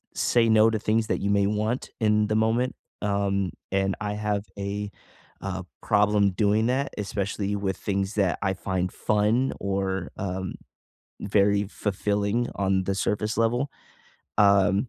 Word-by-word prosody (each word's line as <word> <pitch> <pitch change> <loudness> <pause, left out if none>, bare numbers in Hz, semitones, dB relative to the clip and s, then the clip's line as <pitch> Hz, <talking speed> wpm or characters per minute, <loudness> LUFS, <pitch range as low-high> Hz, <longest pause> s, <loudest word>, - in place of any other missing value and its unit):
say 115 -2 +3
no 110 0 +6
to 110 -1 -1
things 110 +1 +1
that - - 0
you 100 - 0
may 100 -1 +3
want 105 +4 -1
in 105 -1 +3
the 110 - 0
moment, 115 +4 +1 0.3
um, 100 -3 0 0.2
and 95 0 +1
I 105 0 -2
have 105 -1 -1
a, 100 +1 -3 0.5
uh, 95 -2 -4 0.2
problem 105 -2 +3
doing 105 +3 +2
that, 135 +2 0
especially 100 0 -2
with 95 -2 -2
things 100 +1 -2
that 95 -4 +1
I 95 -1 +1
find 95 -1 -2
fun 110 +5 +1
or, 95 -2 -2
um, 95 -1 -3 0.7
very 100 0 +2
fulfilling 105 +3 -1
on 95 -1 +1
the 100 - 0
surface 105 +3 -1
level. 120 +4 +1 0.7
Um, 100 +2 +4
100 Hz, 145 wpm, -26 LUFS, 100-110 Hz, 0.7 s, no